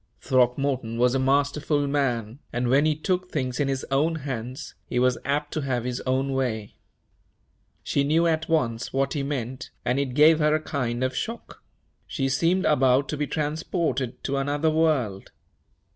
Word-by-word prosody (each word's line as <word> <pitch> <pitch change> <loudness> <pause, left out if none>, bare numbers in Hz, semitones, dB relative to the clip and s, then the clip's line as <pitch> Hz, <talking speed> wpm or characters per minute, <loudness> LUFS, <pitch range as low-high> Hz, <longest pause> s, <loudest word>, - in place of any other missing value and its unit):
Throckmorton 125 -2 +1
was 125 +1 +3
a 135 - +1
masterful 145 +2 +1
man, 130 -4 -1
and, 120 0 -1
when 140 +4 +4
he 155 - +2
took 180 +3 -1
things 130 -6 -2
in 145 - +1
his 135 -1 -2
own 155 +5 +2
hands, 130 -2 -5
he 125 - -3
was 125 0 +2
apt 145 +1 -1
to 155 - -1
have 130 -4 -1
his 125 0 -3
own 135 +1 +1
way. 115 -6 -2 1.1
She 140 - +1
knew 160 +4 +2
at 160 -1 0
once 120 -8 0
what 135 0 0
he 145 - -1
meant, 130 -3 -4 0.2
and 125 +3 +1
it 135 -3 -2
gave 155 +2 +6
her 150 0 +3
a - - +1
kind 125 -5 -2
of 130 0 -1
shock 230 - -5 0.4
she 135 -2 -1
seemed 170 +8 +2
about 135 -2 +3
to 150 - -2
be 145 0 -1
transported 150 -5 -2
to 140 - -1
another 145 +3 +1
world. 145 -12 0
135 Hz, 175 wpm, -25 LUFS, 125-150 Hz, 1.1 s, gave